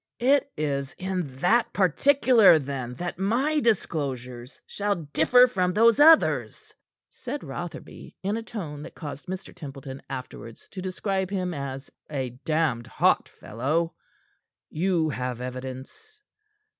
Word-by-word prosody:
"It 275 +2 +2
is 140 -3 -2
in 185 -3 -2
that 230 +6 +3
particular, 230 - +5
then, 130 -4 -4
that 175 +2 -5
my 255 +10 +1
disclosures 135 - -2
shall 205 0 -1
differ 165 - +4
from 185 -7 0
those 230 +4 +5
others," 320 +2 +4 0.4
said 270 +4 -6
Rotherby, 170 +5 -8
in 200 +3 0
a 230 - -3
tone 170 -11 -7
that 165 - -10
caused 145 +1 -8
Mr. 190 +1 -6
Templeton 135 -5 -9
afterwards 125 -3 -8
to 190 - -6
describe 190 0 -2
him 185 -3 -2
as 140 -2 -6 0.2
"a 135 -4 -3
damned 155 -7 0
hot - - +2
fellow." 155 +9 -2 0.8
"You 170 -1 +1
have 125 -3 -3
evidence?" 130 - -8
170 Hz, 125 wpm, -26 LUFS, 135-210 Hz, 0.8 s, particular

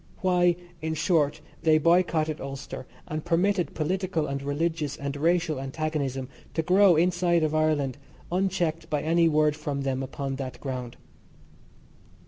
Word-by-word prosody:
Why, 180 -2 +3 0.3
in 160 0 -2
short, 155 -3 +1 0.2
they 155 -1 +5
boycotted 160 -1 +2
Ulster 135 -1 -7 0.2
and 155 0 -4
permitted 175 -1 +1
political 175 0 -1
and 140 0 -3
religious 150 +1 -1
and 140 -1 -4
racial 165 0 +1
antagonism 135 -2 -2 0.3
to 160 - +1
grow 185 +1 +5
inside 175 0 +2
of 155 0 0
Ireland 150 -3 +1 0.3
unchecked 175 -3 0
by 150 -1 -1
any 165 +1 +3
word 150 -1 +3
from 145 -2 -3
them 135 -1 -1
upon 135 0 -4
that 130 -2 -6
ground. 125 -3 -5
155 Hz, 135 wpm, -27 LUFS, 140-170 Hz, 0.3 s, they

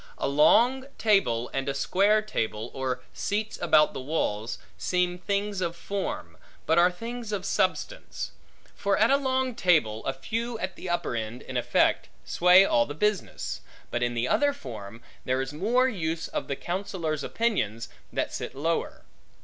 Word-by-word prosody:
A - - -1
long 235 - +4
table 125 - +2
and 135 0 -1
a 140 - -2
square 205 +8 +3
table, 110 - -3
or 130 -1 -3
seats 210 +2 -2
about 155 -3 +4
the - - -5
walls, 120 -6 -2 0.2
seem 180 0 0
things 200 0 -1
of 170 -1 -1
form, 185 - -4 0.3
but 160 +2 +4
are 175 +1 +6
things 230 +4 -6
of 195 -2 -2
substance; 200 - -1 0.4
for 200 0 0
at 220 +4 +4
a 275 - +6
long 260 -2 0
table 155 - +2
a 135 - +1
few 225 - -3
at 185 -3 -4
the 185 - -7
upper 175 -8 -1
end, 115 +2 -4
in 130 - -8
effect, 125 - +2 0.2
sway 180 +2 +6
all 120 -10 +3
the 145 - -6
business; 210 +3 -1 0.3
but 120 - -1
in 120 0 0
the 120 +1 0
other 285 -1 +3
form, 115 - -9 0.2
there 130 +1 0
is 135 +2 -3
more 235 +11 +2
use 165 -8 -2
of - - -4
the 140 - -2
counsellors' 175 -5 -3
opinions, 115 - -1 0.2
that - - -2
sit - - -5
lower. 160 +4 -2
175 Hz, 165 wpm, -27 LUFS, 130-210 Hz, 0.4 s, are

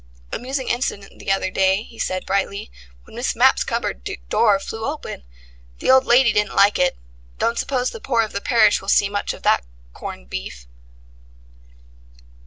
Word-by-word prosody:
"Amusing 260 +1 -3
incident 220 -5 -3
the - - -2
other 195 -1 0
day," 190 +2 +2
he 230 -1 -16
said 185 0 -2
brightly, 200 +2 -2 0.3
"when - - -16
Miss - - -1
Mapp's - - +4
cupboard - - -3 0.2
door 210 -4 +4
flew 225 +3 -6
open. 290 - -5 0.6
The - - +2
old 260 0 +5
lady 240 -2 +5
didn't 210 0 0
like 200 +1 +4
it. 180 - +2 0.4
Don't 230 0 0
suppose 255 -2 -1
the 460 - -9
poor 235 - +1
of 215 - -6
the 200 - -3
parish 225 -3 +4
will 195 - -6
see 200 - +4
much 205 0 -2
of - - -10
that - - +3 0.3
corned 60 - -8
beef." 60 0 -7
210 Hz, 170 wpm, -21 LUFS, 195-240 Hz, 0.6 s, old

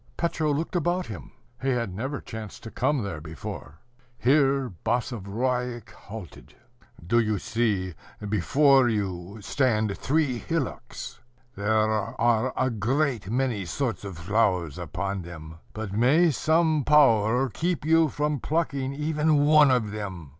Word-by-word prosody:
Petro 160 -2 0
looked 160 +5 -2
about 175 +2 0
him: 105 - -9 0.3
he 135 - 0
had 120 -7 -1
never 130 +8 -4
chanced 110 -2 -8
to 110 - -8
come 145 -6 0
there 85 -7 -5
before. 80 -2 -8 0.4
Here 135 -2 +2
Basavriuk 120 +1 -2
halted. 105 -3 -11 0.5
"Do 115 +7 +3
you 110 -2 +1
see, 100 -4 -1 0.3
before 130 - +4
you 100 -2 -3
stand 110 -3 +1
three 140 -4 0
hillocks? 125 -6 -4 0.4
There 100 +2 -3
are 110 +3 +1
a 130 0 +1
great 120 0 0
many 120 -4 0
sorts 115 +1 -2
of 95 -4 -7
flowers 90 -3 0
upon 95 +4 -3
them. 80 -2 -10
But 110 -3 -6
may 145 +10 +4
some 160 0 +2
power 125 -4 +4
keep 165 +5 -2
you 165 0 +4
from 150 +1 -1
plucking 140 -3 -1
even 150 0 +2
one 150 -1 +6
of 120 -5 +1
them. 95 -8 -6
120 Hz, 130 wpm, -26 LUFS, 100-140 Hz, 0.5 s, one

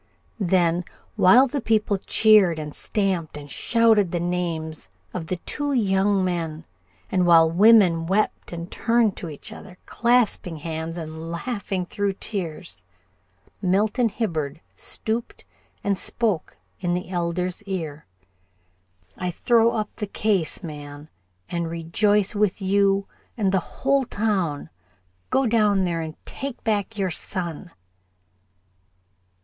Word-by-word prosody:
Then, 175 -2 +2 0.3
while 240 +9 +7
the 275 +1 -3
people 210 -3 +1
cheered 205 -5 +4
and 150 -1 -6
stamped 185 -7 -1
and 145 -1 -10
shouted 225 -5 +3
the 175 - -2
names 170 -3 -3 0.2
of 165 -3 -5
the 185 - -1
two 290 - -3
young 195 -4 +2
men, 165 -3 -3 0.5
and 180 -2 +2
while 165 -1 +6
women 180 -4 +5
wept 205 +4 0
and 170 0 -6
turned 230 -3 +2
to 170 - -6
each 145 - -8
other, 180 - -11
clasping 235 -8 +1
hands 160 +2 -5
and 160 0 -6
laughing 190 0 -3
through 200 +1 -1
tears, 170 - -4 0.8
Milton 210 +5 +2
Hibbard 160 - -3 0.2
stooped 225 +2 -4 0.4
and 200 -1 +1
spoke 210 -2 -1 0.2
in 175 -1 0
the 180 0 -4
Elder's 180 +1 -2
ear. 160 - -5 1.1
"I 180 - -1
throw 230 +6 +3
up 215 -2 -3
the 210 - -3
case, 200 -4 -1
man, 145 -1 -9 0.4
and 170 -1 -2
rejoice 190 +5 +1
with 210 -2 +1
you 195 0 +2 0.3
and 200 -4 +1
the 190 - +3
whole 275 +9 0
town. 195 -10 -1 0.6
Go 270 - +2
down 210 -4 +3
there 170 -2 -1
and 160 0 -6
take 275 -2 -6
back 215 -1 -1
your 190 -3 0
son." 175 +1 -3
185 Hz, 125 wpm, -24 LUFS, 165-210 Hz, 1.1 s, while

